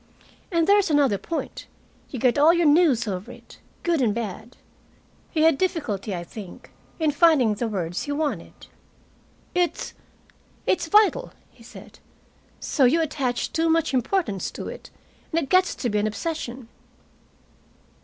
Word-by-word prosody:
And 335 -2 +2
there's 400 0 +4
another 280 -9 +3
point 330 - -5 0.4
you 265 - -6
get 245 +1 +2
all 305 +3 +7
your 340 -1 +2
news 290 -6 +4
over 190 -1 -4
it, - - -15 0.2
good 335 -4 +1
and 220 -4 +1
bad." 225 +1 -6 0.7
He 315 - -1
had 320 -4 +4
difficulty, 225 - -2
I 175 - -5
think, 195 +1 -11 0.3
in 315 -2 +1
finding 290 -7 +4
the 230 +3 -2
words 180 -5 -3
he 290 - -4
wanted. 295 0 -3 0.9
"It's 355 -1 -1 0.7
it's 350 -2 +1
vital," 425 +6 +3 0.2
he - - -22
said. - - -13 0.6
"So 275 - +2
you 275 +7 +4
attach 275 -6 -2
too 325 0 +1
much 325 -4 +1
importance 255 - 0
to - - -6
it, - - -10 0.4
and 330 0 +1
it 275 - -8
gets 370 0 +3
to 250 - -3
be 210 -2 0
an 210 - +1
obsession." 255 0 -5
285 Hz, 150 wpm, -24 LUFS, 225-330 Hz, 0.9 s, all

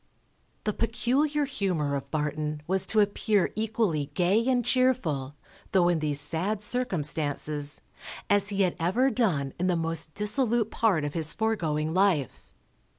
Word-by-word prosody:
The 210 - -1
peculiar 280 +7 0
humour 185 - -2
of 140 0 -5
Barton 150 0 -3
was 190 +2 -1
to 215 - +4
appear 205 -1 +1
equally 215 - -1
gay 190 +6 +2
and 245 -3 +1
cheerful, 175 - 0 0.4
though 180 -2 +4
in 170 -2 +1
these 150 -2 +2
sad 175 +8 +2
circumstances, 150 - 0 0.5
as 205 0 +2
he 200 -1 +1
had 180 - 0
ever 230 +11 +1
done 155 - 0
in 180 - 0
the 180 - +1
most 165 -1 -2
dissolute 225 +1 0
part 195 -9 +1
of 145 0 -3
his 160 -2 +3
foregoing 160 -9 -1
life. 180 - 0
185 Hz, 145 wpm, -27 LUFS, 150-220 Hz, 0.5 s, to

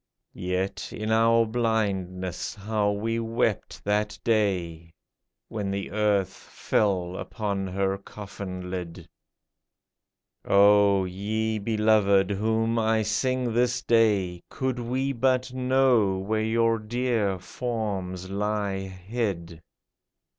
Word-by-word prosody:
Yet, 90 +1 -3
in 110 +1 -3
our 115 +1 +4
blindness, 100 -6 -1
how 105 0 0
we 110 +3 -1
wept 115 0 -1
that 105 +1 0
day. 90 -7 0 0.5
When 105 -3 -3
the 100 0 -3
earth 100 -3 +1
fell 95 -4 -1
upon 100 -2 -3
her 95 +1 -1
coffin 95 -3 -8
lid! 90 -2 -6 1.4
O, 100 -1 +5
ye 110 +4 -2
beloved 105 -2 +3
whom 110 +3 +1
I 110 0 +2
sing 125 +3 0
this 125 +1 +1
day, 100 -6 +2
Could 130 -2 -2
we 130 +3 -1
but 130 0 +1
know 125 -6 +3
where 110 +3 -1
your 115 +1 +2
dear 110 -3 0
forms 95 -4 -4
lie 100 -1 -1
hid 95 -3 -4
105 Hz, 105 wpm, -26 LUFS, 95-115 Hz, 1.4 s, O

